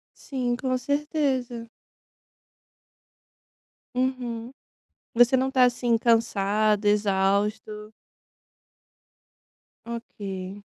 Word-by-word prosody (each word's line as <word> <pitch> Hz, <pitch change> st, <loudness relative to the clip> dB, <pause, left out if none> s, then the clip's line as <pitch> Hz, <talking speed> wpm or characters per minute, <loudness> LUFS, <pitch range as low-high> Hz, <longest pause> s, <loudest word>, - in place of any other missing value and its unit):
Sim, 250 Hz, -3 st, -2 dB
com 255 Hz, 0 st, -1 dB
certeza. 265 Hz, -3 st, -1 dB, 2.2 s
Uhum. 250 Hz, -1 st, -2 dB, 0.6 s
Você 245 Hz, +2 st, +5 dB
não 260 Hz, +1 st, +1 dB
está 260 Hz, -1 st, +4 dB
assim, 240 Hz, -1 st, +1 dB
cansado, 215 Hz, -2 st, +2 dB
exausto? 210 Hz, +1 st, 0 dB, 1.9 s
Ok. 200 Hz, -4 st, -7 dB
230 Hz, 60 wpm, -25 LUFS, 210-255 Hz, 2.2 s, Você